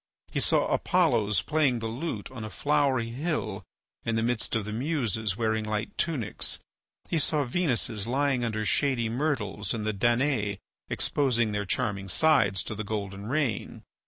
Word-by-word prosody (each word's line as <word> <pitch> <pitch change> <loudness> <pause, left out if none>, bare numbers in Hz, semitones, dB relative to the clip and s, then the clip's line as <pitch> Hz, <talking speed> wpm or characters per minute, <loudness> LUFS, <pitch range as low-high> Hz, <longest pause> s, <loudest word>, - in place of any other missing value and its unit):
He - - 0
saw - - +3
Apollos 105 -3 +2
playing 150 -5 +2
the 115 - -4
lute 115 -1 -4
on 125 -4 -7
a 110 - -5
flowery 140 -4 +1
hill, 120 - -2 0.4
in 115 - 0
the 115 - +1
midst 120 -1 0
of 110 -3 0
the 105 - -4
Muses 110 - -1
wearing 110 -1 +1
light 105 0 -3
tunics. 150 -10 -1 0.5
He 165 - +1
saw 150 0 +2
Venuses 120 - 0
lying 135 0 +1
under 110 -2 -1
shady 125 -2 +2
myrtles 115 -7 -1
and 110 -2 -3
the 110 - 0
Danae 115 -1 +1 0.3
exposing 120 -6 +1
their 105 0 -1
charming 100 -3 -1
sides 135 - +4
to - - -5
the 110 0 -4
golden 100 -1 -4
rain. 130 -5 -1
115 Hz, 160 wpm, -28 LUFS, 105-140 Hz, 0.5 s, sides